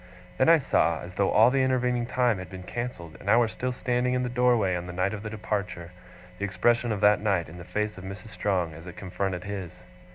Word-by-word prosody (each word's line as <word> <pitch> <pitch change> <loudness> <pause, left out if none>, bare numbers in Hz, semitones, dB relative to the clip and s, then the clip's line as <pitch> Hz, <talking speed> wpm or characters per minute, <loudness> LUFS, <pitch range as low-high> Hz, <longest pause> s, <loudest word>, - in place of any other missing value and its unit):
Then 130 - +5
I 165 - +8
saw, 85 - +1
as 90 +1 -9
though 100 +1 +1
all 110 +3 +6
the 135 0 +2
intervening 125 -2 +1
time 120 -5 +1
had 95 - -8
been 95 -1 -8
cancelled, 90 -8 -6
and 100 - -5
I 110 - +6
were 120 -1 +4
still 125 +3 -3
standing 125 0 0
in 125 - 0
the 125 - -2
doorway 120 -6 +2
on 90 0 -4
the 90 - -6
night 95 +3 0
of 105 - -5
the 105 - -5
departure, 105 -5 -4 0.5
the - - -4
expression 120 +4 +1
of 105 -2 -2
that 105 0 +5
night 100 -5 +1
in 85 +3 -11
the - - -8
face 105 +2 -3
of - - -10
Mrs. 95 +3 -8
Strong, 90 -7 -1
as 80 +3 -11
it 90 0 -9
confronted 95 -1 -3
his. 95 -9 -7
105 Hz, 240 wpm, -27 LUFS, 90-120 Hz, 0.5 s, I